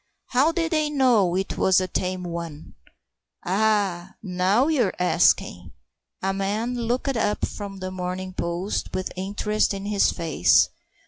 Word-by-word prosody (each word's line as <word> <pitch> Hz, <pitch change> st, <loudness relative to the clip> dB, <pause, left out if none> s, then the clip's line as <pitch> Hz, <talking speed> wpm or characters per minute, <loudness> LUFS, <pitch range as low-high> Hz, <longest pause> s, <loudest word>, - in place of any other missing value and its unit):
"How 270 Hz, +6 st, +3 dB
did 330 Hz, -1 st, -1 dB
they 310 Hz, -2 st, +1 dB
know 245 Hz, -11 st, +3 dB
it 190 Hz, +1 st, -2 dB
was 190 Hz, -1 st, +4 dB
a 185 Hz, -, -1 dB
tame 185 Hz, 0 st, -2 dB
one?" 170 Hz, -3 st, -7 dB, 0.7 s
"Ah, 195 Hz, -2 st, 0 dB
now 190 Hz, +6 st, +2 dB
you're 255 Hz, -12 st, +1 dB
asking!" 180 Hz, -1 st, +2 dB, 0.5 s
A 195 Hz, 0 st, +1 dB
man 205 Hz, +5 st, -1 dB
looked 245 Hz, +3 st, -1 dB
up 210 Hz, -2 st, 0 dB
from 200 Hz, -2 st, -7 dB
The 185 Hz, 0 st, -5 dB
Morning 185 Hz, 0 st, -4 dB
Post 170 Hz, +3 st, -3 dB
with 185 Hz, -, -3 dB
interest 205 Hz, +2 st, -1 dB
in 195 Hz, 0 st, -6 dB
his 205 Hz, -1 st, +2 dB
face. 160 Hz, -, +3 dB
195 Hz, 140 wpm, -24 LUFS, 180-225 Hz, 0.7 s, was